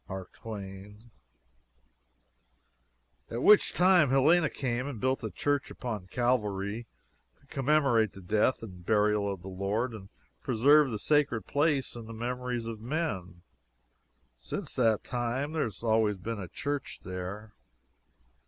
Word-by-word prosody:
M. 95 0 -5
T.] 100 -2 -8 2.3
at 120 +2 -3
which 210 -1 +6
time 180 -5 +5
Helena 150 +5 +4
came 125 0 -2
and 135 -6 -5
built 130 +4 0
a - - -2
church 145 -2 -1
upon 110 -7 -5
Calvary 105 -1 -1 0.5
to - - -27
commemorate 135 -6 +2
the 95 - -11
death 110 +7 +1
and 90 -5 -9
burial 105 0 +2
of 95 -2 -7
the - - -8
Lord 100 +6 -2
and 100 -3 -10 0.3
preserve 140 +4 +5
the 110 - -3
sacred 140 -2 +1
place 145 - 0
in 115 -1 -8
the 115 - -8
memories 125 +1 -3
of 115 -2 -6
men; 110 - -3 0.9
since - - -6
that 115 -4 +2
time 125 +4 -2
there 160 -1 0
has 110 -1 -8
always 110 -2 +2
been 110 +4 -5
a 95 - -5
church 145 +8 -4
there. 95 +4 -6
115 Hz, 135 wpm, -30 LUFS, 100-135 Hz, 2.3 s, which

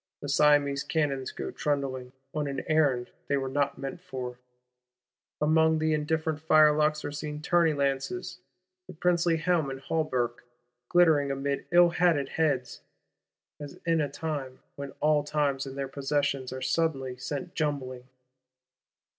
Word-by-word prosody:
The 145 - -6
Siamese 145 -1 +4
cannons 140 -5 -1
go - - -5
trundling, 135 -3 -2 0.2
on 150 -1 -1
an 140 -1 -3
errand 145 -6 +1 0.2
they 140 - +1
were 135 -1 -2
not 140 +1 0
meant 140 +5 -6
for. 125 -7 -6 1.0
Among 160 +1 +3
the 155 0 +1
indifferent 155 0 -1
firelocks 155 -1 +4
are - - -3
seen 150 0 -5
tourney 165 0 +3
lances; 140 +7 -2 0.5
the 185 - -9
princely 170 0 +2
helm 165 -3 +1
and 135 0 -5
hauberk 130 -5 -1 0.5
glittering 160 -5 +4
amid 140 +1 -2
ill 175 0 +7
hatted 170 -5 +2
heads,—as 145 0 -5
in 165 -1 +2
a 145 - -1
time 140 -3 -4 0.2
when 140 0 -6
all 150 -1 +3
times 145 -2 -1
and 135 0 -8
their 135 -1 -2
possessions 140 -1 -1
are 130 0 -5
suddenly 135 -2 0
sent 140 +6 -5
jumbling! 135 -6 -3
145 Hz, 140 wpm, -28 LUFS, 135-160 Hz, 1.0 s, ill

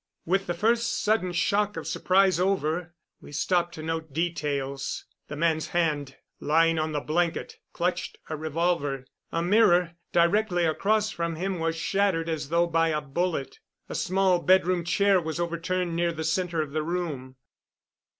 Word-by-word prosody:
With 195 +3 +1
the 175 - -1
first 230 +5 +1
sudden 210 -4 +1
shock 205 +3 +1
of - - -5
surprise 190 -1 +3
over, 175 -2 0 0.3
we - - -12
stopped 175 +3 0
to 155 - -7
note 160 -1 -3
details. 140 -4 -2 0.2
The 150 - -6
man's 160 0 +1
hand, 150 -5 -1 0.2
lying 165 +1 +3
on 155 0 -1
the 150 - -1
blanket, 170 +3 -1
clutched 180 +1 -2
a 155 - -3
revolver. 155 -3 -1 0.3
A 165 - -1
mirror 180 -3 +4 0.2
directly 175 +1 +3
across 210 +7 +1
from 170 -3 -3
him 185 +2 -2
was 165 0 0
shattered 170 -1 0
as 155 -3 -3
though 170 +1 +3
by 165 -1 +2
a 155 -2 0
bullet. 150 0 -3 0.3
A - - -5
small 185 -1 +2
bedroom 185 -1 +3
chair 195 +2 +3
was 160 +1 -4
overturned 170 +1 -1
near 170 0 +1
the 160 -1 -5
center 165 0 0
of 145 - -9
the 155 +1 -1
room. 155 -6 -4
170 Hz, 160 wpm, -27 LUFS, 160-185 Hz, 0.3 s, mirror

